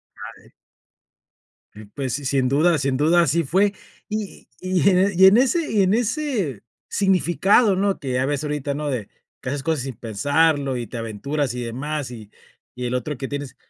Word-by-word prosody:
Dale. - - -12 1.4
Pues 130 -4 -3
si 140 0 -4
sin 130 -1 +1
duda 160 +6 +3
sin 135 -1 0
duda 165 +4 +4
así 165 +2 +1
fue 195 +8 +2 0.4
y 215 -2 -5
y 185 +1 +2
en 185 0 +2
y 190 - +7
en 195 +3 +7
ese 305 +6 +1
y 210 -2 +3
en 190 +2 +2
ese 235 - -1 0.3
significado, 195 +2 +3
¿no?, 195 +1 0
que 135 -3 -4
ya 130 +1 +1
ves 145 +1 -2
ahorita, 145 -1 -2
¿no?, 150 0 -3
de 115 -6 -4 0.3
que - - -6
haces 140 +1 -3
cosas 160 -2 -1
sin 130 -5 -6
pensarlo 145 +4 +1
y 120 -2 -4
te 120 - -7
aventuras 120 +5 -3
y 125 - -4
demás 135 +3 -4
y 110 -4 -10 0.4
y 125 0 -6
el 120 - -2
otro 140 +4 -3
que 135 +2 -5
tienes, 145 -2 -6
145 Hz, 185 wpm, -22 LUFS, 130-185 Hz, 1.4 s, y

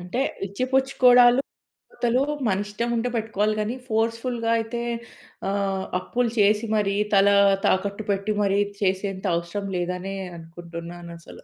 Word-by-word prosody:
అంటే, 180 +8 -3 0.3
ఇచ్చిపుచ్చుకోడాలు, 255 +2 +4 0.5
పోతలు 245 +2 +1 0.3
మనిష్టముంటే 225 +5 -1
పెట్టుకోవాలి 215 -1 0
గానీ, 215 +4 -2
ఫోర్స్‌ఫుల్‌గా 230 +1 -1
అయితే 225 +1 -4 0.7
ఆహ్, 195 -1 -1
అప్పులు 240 +4 -1
చేసి 210 +2 +3
మరీ, 200 -2 +1 0.2
తలా 200 0 +5 0.3
తాకట్టు 200 +2 0
పెట్టి 200 +2 -1
మరీ 200 0 +2 0.2
చేసేంత 190 0 -1
అవసరం 170 +4 -4
లేదనే 180 +2 -3 0.2
అనుకుంటున్నానసలు. 170 0 -10
205 Hz, 105 wpm, -24 LUFS, 190-230 Hz, 0.7 s, తలా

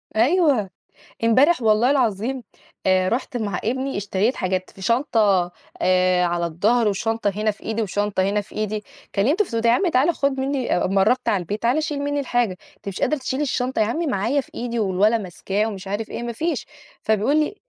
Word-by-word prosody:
أيوه، 265 - +3 0.5
إمبارح 260 +8 +4
والله 225 +3 +3
العظيم 250 -1 0 0.4
آآ، 185 0 +3
رُحت 245 +2 -2
مع 205 -5 -2
إبني 260 +3 -2
اشتريت 205 +4 0
حاجات 185 0 -2
في 190 - -15
شنطة 210 -6 +2 0.3
آآ، 185 -1 +3
على 170 0 0
الضهر 210 +8 +2
وشنطة 225 +2 0
هنا 215 +1 +1
في 205 - -17
إيدي 225 +1 -2
وشنطة 205 -1 0
هنا 200 +2 +1
في 205 - -16
إيدي، 215 0 -2 0.3
كلّمتُه 290 - +2
في 250 - -13
التليفون - - +1
قُلت 225 - -3
له - - +5
يا - - +5
عم 375 - +1
تعالَ 305 +4 +3
خُد 275 -2 0
مني 265 -1 -1
أمّا 195 +2 +2
قرّبت 250 +6 +2
على 195 -3 +1
البيت 205 +5 -4
تعالَ 255 +7 +2
شيل 295 -2 -3
مني 285 0 -1
الحاجة، 245 -5 0 0.3
أنتِ - - -16
مش 195 - -5
قادرة 305 - +2
تشيلي 265 +1 -2
الشنطة، 255 -3 -1
يا 215 - +4
عمي 315 +9 -1
معايا 270 +4 +1
في - - -20
إيدي 235 -1 -3
والولد 210 +3 +2
ماسكاه 195 +3 -2
ومش 195 -3 -7
عارف 205 +3 -3
إيه، - - -5
ما 240 - -3
فيش 315 +3 -2 0.4
فبيقول 220 +7 +2
لي 305 +7 -1
225 Hz, 205 wpm, -22 LUFS, 200-260 Hz, 0.5 s, له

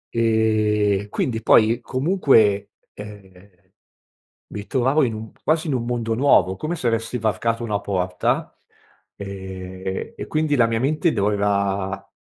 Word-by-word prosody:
ehm, 110 -3 +1
quindi 115 +1 -2
poi 115 +2 +4
comunque, 130 - +2 0.2
ehm, 100 -3 -13 0.9
mi 105 0 -7
trovavo 135 +3 +2
in 115 -4 -1
un 110 0 -8
quasi 160 +1 +1
in 145 - -1
un 120 -2 -2
mondo 120 -2 -2
nuovo, 110 -7 +3
come 155 - -4
se 150 - -7
avessi 115 +1 -1
varcato 115 +1 -1
una 105 -3 -1
porta, 90 -2 -2 0.6
ehm, 95 -1 -6
e - - -7
quindi 155 -1 0
la 120 -4 +4
mia 115 0 -1
mente 155 +5 +1
doveva 100 -2 -1
110 Hz, 135 wpm, -22 LUFS, 100-120 Hz, 0.9 s, poi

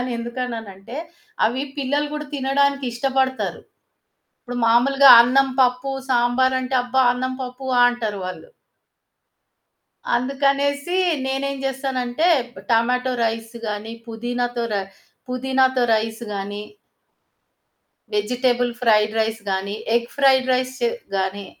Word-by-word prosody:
అనెందుకన్నానంటే, 235 -3 -5 0.5
అవి 250 +4 -2 0.2
పిల్లలు 285 +2 0
కూడా 300 0 -5
తినడానికి 280 0 +1
ఇష్టపడతారు. 260 +1 -1 0.8
ఇప్పుడు 245 -1 -7
మాములుగా 270 +4 +6
అన్నం, 270 +3 +3
పప్పు, 250 +2 0 0.2
సాంబార్ 250 +2 +2
అంటే 255 +1 -1
అబ్బా! 260 +1 +1
అన్నం 255 +1 -3
పప్పు 255 +1 -8
ఆహ్, 245 - +7
అంటారు 220 -4 -4
వాళ్ళు. 185 - -8 1.7
అందుకనేసి 280 +5 0 0.3
నేనేం 275 +1 -2
చేస్తానంటే 265 +2 -1 0.3
ప్ - - -11
టమాటో 250 +3 +2
రైస్ 225 +1 -3
గాని, 210 +1 -4
పుదీనాతో 240 +1 -3
రై 200 - 0 0.5
పుదీనాతో 260 0 +1
రైస్ 220 +1 -2
గాని. 205 +1 -5 1.5
వెజిటబుల్ 245 +3 +1
ఫ్రైడ్ 215 -2 +3
రైస్ 220 0 -2
గాని 195 +2 -2 0.2
ఎగ్ 235 0 -2
ఫ్రైడ్ 265 -2 +4
రైస్ 255 0 -1
చే 475 - +3 0.3
గాని. 190 +1 -2
250 Hz, 110 wpm, -21 LUFS, 230-265 Hz, 1.7 s, ఆహ్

